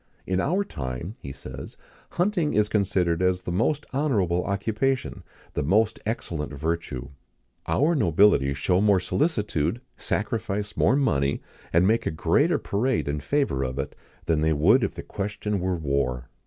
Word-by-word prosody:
"In 95 0 0
our 180 - +1
time," 65 - -5
he 70 - -7
says, 65 -1 -9 0.4
"hunting 175 -4 +1
is 105 0 +3
considered 90 -4 +1
as 90 0 +1
the 90 - -4
most 140 - 0
honourable 100 - +1
occupation, 110 +6 -1 0.3
the - - -1
most 100 +9 +2
excellent 85 -9 -3
virtue. 80 -5 -3 0.6
Our 155 +5 +3
nobility 85 - +4
show 90 +7 +1
more 100 -2 +4
solicitude, 105 - 0 0.2
sacrifice 105 -1 -2
more 130 - +3
money, 70 - +1 0.3
and 85 +2 +4
make 110 +4 +2
a - - +3
greater 80 - +2
parade 115 - 0
in 75 +1 -1
favour 135 - 0
of 65 0 -3
it, 70 - -3 0.3
than 80 -2 +1
they 80 0 +3
would 100 - +4
if - - -1
the - - -6
question 105 0 -3
were 90 0 0
war. 65 -5 -1
95 Hz, 155 wpm, -25 LUFS, 75-110 Hz, 0.6 s, nobility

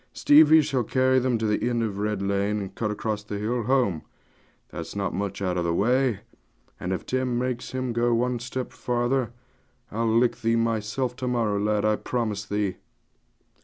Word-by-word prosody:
'Stevie 155 +1 +6
shall 135 -4 0
carry 130 +2 +2
them 125 -2 +1
to 110 - -2
the 105 +3 +1
end 120 -1 0
of 100 -3 -3
Red 105 -1 -1
Lane, 100 +1 0
and 95 -2 -6
cut 110 - -2
across 105 0 -2
the 105 0 -6
hill 115 +4 -1
home: 120 - +1 0.7
that's - - -7
not 100 -2 -2
much 100 +1 -3
out 90 -1 0
of - - 0
the 85 0 0
way; 125 +1 +2 0.6
and 90 - -3
if 95 - -3
Tim 130 -1 -1
makes 125 -1 -2
him 130 -1 -3
go 120 +1 +1
one 120 +1 +1
step 125 +1 -5
farther, 120 0 -1 0.6
I'll 115 +2 0
lick 115 +2 +3
thee 115 +1 +2
myself 115 +2 -1
to 130 - -3
morrow, 115 -5 0
lad, 105 0 +1
I 110 0 +2
promise 110 -4 -2
thee.' 105 -2 -2
115 Hz, 185 wpm, -25 LUFS, 105-125 Hz, 0.7 s, Stevie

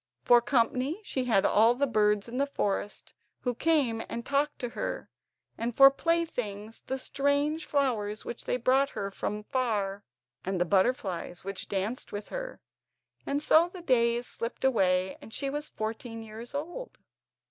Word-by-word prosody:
For 240 - +6
company 255 - +1
she 260 -10 -2
had 220 -6 +3
all 225 +3 +5
the 280 +3 +2
birds 210 -4 +2
in 245 +2 -4
the 280 - +2
forest, 205 -6 -3 0.3
who 245 - -1
came 255 -5 +2
and 235 +1 -5
talked 285 +2 0
to 245 - -4
her, - - -4 0.5
and 235 0 -2
for 275 0 +9
playthings 245 -10 -2
the 265 - -1
strange 285 +4 0
flowers 225 -7 0
which 240 - -6
they - - 0
brought 265 +3 +3
her 200 0 -4
from 210 +2 -4
far, 210 -5 -1 0.4
and 190 -1 -2
the 175 - +2
butterflies 190 - 0
which 195 0 -5
danced 200 +5 -2
with 205 0 -6
her. - - -6 0.7
And 285 +1 0
so 325 +3 +5
the 360 -1 -10
days 240 -4 +2
slipped 235 +2 -4
away, 190 -7 +2
and - - -12
she 275 +4 -2
was 295 +1 -3
fourteen 225 +1 -5
years 225 +4 -9
old. 350 +13 -5
240 Hz, 160 wpm, -29 LUFS, 210-280 Hz, 0.7 s, for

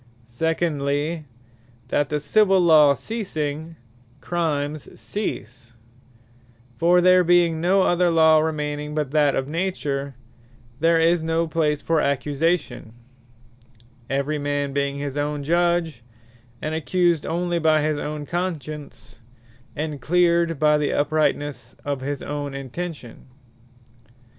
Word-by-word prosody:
Secondly, 150 +3 -1 0.6
that 145 -1 0
the 150 - -1
Civill 195 +4 +3
Law 155 -4 +6
ceasing, 160 -8 -4 0.4
Crimes 150 -3 -3
cease: 120 - -6 1.0
for 175 +6 +4
there 185 0 +5
being 170 -2 +3
no 185 +3 +3
other 175 0 +2
Law 160 -1 +5
remaining, 150 -1 -3
but 150 -3 -2
that 145 -2 +3
of 135 - -2
Nature, 145 -5 -3 0.6
there 165 +1 +3
is 165 +1 +3
no 165 +1 0
place 155 -2 0
for 165 -2 +1
Accusation; 145 -2 -1 1.2
every 140 +3 -1
man 145 -1 -2
being 140 0 -1
his 140 0 -4
own 145 0 -2
Judge, 170 -3 +1 0.6
and 155 - -2
accused 170 0 +1
onely 175 +1 -1
by 155 -2 +3
his 155 -1 0
own 150 0 -5
Conscience, 155 -7 -5 0.6
and 150 -2 -4
cleared 170 +1 +2
by 150 +1 +3
the 150 - 0
Uprightnesse 145 -4 -1
of 140 -2 -2
his 140 +1 -4
own 145 -1 -4
Intention. 140 -2 -7
155 Hz, 115 wpm, -23 LUFS, 145-170 Hz, 1.2 s, Law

